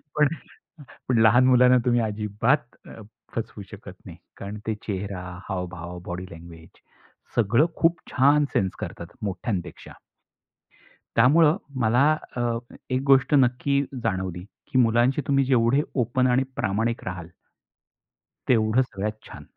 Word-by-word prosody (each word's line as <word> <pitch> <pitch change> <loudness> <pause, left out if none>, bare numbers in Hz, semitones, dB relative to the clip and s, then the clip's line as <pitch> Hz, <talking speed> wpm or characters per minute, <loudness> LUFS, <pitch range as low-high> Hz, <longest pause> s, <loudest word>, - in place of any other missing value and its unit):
पण 150 -1 +4 0.9
लहान 115 +3 +5
मुलांना 125 0 +6
तुम्ही 120 -1 +3
अजिबात 110 +5 -1
अ, 115 - -11 0.3
फसवू 110 -2 -5
शकत 100 -2 -10
नाही 85 -2 -10 0.2
कारण 100 +2 -7
ते 110 - +1
चेहरा, 100 -2 -4 0.3
हावभाव, 90 -1 -5
बॉडी 90 +1 -5
लँग्वेज 85 0 -12 0.7
सगळं 120 +7 +3
खूप 165 0 +2
छान 145 +3 +4
सेन्स 95 -2 0
करतात 85 -4 -6 0.2
मोठ्यांपेक्षा. 95 -3 -4 1.3
त्यामुळं 150 +7 +5 0.2
मला 120 +4 +3 0.3
अ, 120 - -1 0.5
एक 130 +1 0
गोष्ट 135 +2 +4
नक्की 140 +1 +2 0.2
जाणवली, 95 -2 -2 0.3
की 130 - +3
मुलांशी 120 +4 +3
तुम्ही 140 -1 +3
जेवढे 130 +2 +3
ओपन 125 0 +1
आणि 125 +2 +3
प्रामाणिक 115 +4 -1
राहाल 90 -3 -6 1.2
तेवढं 110 0 +3
सगळ्यात 105 -3 -4
छान. - - -11
115 Hz, 120 wpm, -24 LUFS, 95-130 Hz, 1.3 s, मुलांना